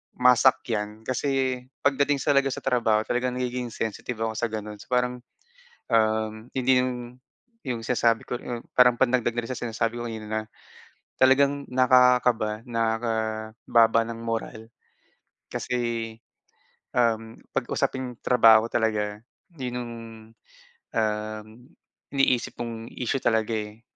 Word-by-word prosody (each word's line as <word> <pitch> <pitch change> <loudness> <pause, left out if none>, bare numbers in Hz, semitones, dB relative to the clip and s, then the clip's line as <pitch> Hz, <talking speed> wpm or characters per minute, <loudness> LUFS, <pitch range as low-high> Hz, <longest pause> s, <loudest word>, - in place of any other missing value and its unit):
masakyan 115 -4 +2
kasi 130 +1 0 0.2
pagdating 140 0 +2
talaga 140 -1 +3
sa 135 - -4
trabaho 110 -3 +2
talagang 125 +2 -1
nagiging 125 -1 -2
sensitive 115 +1 -4
ako 110 - 0
sa 110 +2 -1
gano'n. 105 -1 -6
So - - -13
parang, 125 0 0 0.7
um, 110 -1 +2 0.2
hindi 130 0 +3
yung 125 -1 -6 0.5
yung 120 -3 -3
sinasabi 115 -1 +2
ko 125 - -1
yung 120 -1 -6 0.2
parang 125 -1 +7
pandagdag 120 -1 +1
na 120 - -1
rin 115 - -8
sa 130 - -3
sinasabi 115 0 -2
ko 120 - -4
kanina 110 -2 -6
na 110 0 -1 0.8
talagang 140 +2 +4
nakakaba 125 -3 +3
nakababa 115 0 +1
ng 115 0 -7
moral. 115 -1 -4 0.8
Kasi, 115 -2 -2 0.8
um, 115 -2 0 0.2
pag - - +1
usaping 125 -2 -2
trabaho 115 -2 +6
talaga 105 -2 -1 0.3
yun 125 -3 -4
yung, 120 -1 -6 1.1
um, 110 0 -1 0.6
iniisip 135 -3 +1
mong 115 -1 -6
issue 125 +2 -1
talaga, 110 -1 +1
eh. 105 +1 -5
120 Hz, 125 wpm, -26 LUFS, 110-125 Hz, 1.1 s, parang